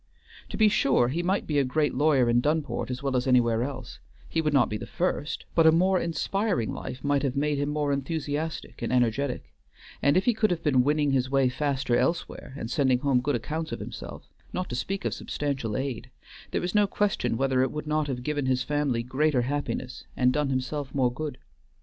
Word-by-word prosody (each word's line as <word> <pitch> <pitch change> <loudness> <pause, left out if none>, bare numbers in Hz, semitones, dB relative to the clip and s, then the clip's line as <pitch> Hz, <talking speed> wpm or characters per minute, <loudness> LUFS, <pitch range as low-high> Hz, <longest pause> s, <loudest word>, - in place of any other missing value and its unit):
To - - -5
be 220 - +6
sure, 135 -12 +3
he 160 +6 -1
might 190 +3 0
be 150 -2 +1
a - - +3
great 150 +3 0
lawyer 135 -2 +3
in 120 +1 +3
Dunport 150 0 -1
as 125 +1 -4
well 135 -2 0
as 125 +1 0
anywhere 120 -3 +3
else; 130 -1 -5 0.3
he 165 - 0
would 155 -1 0
not 140 -3 +4
be 105 - -3
the - - -8
first; 170 -4 -2
but 165 -1 +5
a - - +8
more 185 +3 +3
inspiring 170 - -1
life 130 - -7
might 145 -1 +2
have 135 -1 -1
made 145 0 0
him 145 0 0
more 150 -1 0
enthusiastic 150 +2 -3
and - - -2
energetic, 125 - 0 0.5
and 140 +5 +4
if 190 - +2
he 245 - +4
could 220 -1 +2
have 175 -2 -2
been 130 -5 +4
winning 145 +1 +2
his 130 -1 +1
way 135 -1 +3
faster 135 -1 0
elsewhere, 165 -4 -1
and 115 -3 -5
sending 130 -3 +3
home 130 -1 +2
good 145 +1 0
accounts 155 +7 -3
of - - -4
himself, - - -8 0.2
not 180 - -3
to 120 - -3
speak 195 +10 -3
of - - 0
substantial 135 -7 -3
aid, 130 -3 -4 0.4
there - - -2
is 180 - -2
no 210 -1 +4
question 200 - 0
whether 135 0 +2
it 130 - +1
would 150 0 -5
not 155 0 0
have 125 -3 -4
given 145 -1 -1
his 130 -1 +1
family 145 -5 0
greater 130 +1 +1
happiness 135 -1 -3
and 125 0 +3
done 150 -1 0
himself 135 +1 -3
more 125 -3 +2
good. 145 -1 -5
140 Hz, 215 wpm, -27 LUFS, 125-155 Hz, 0.5 s, a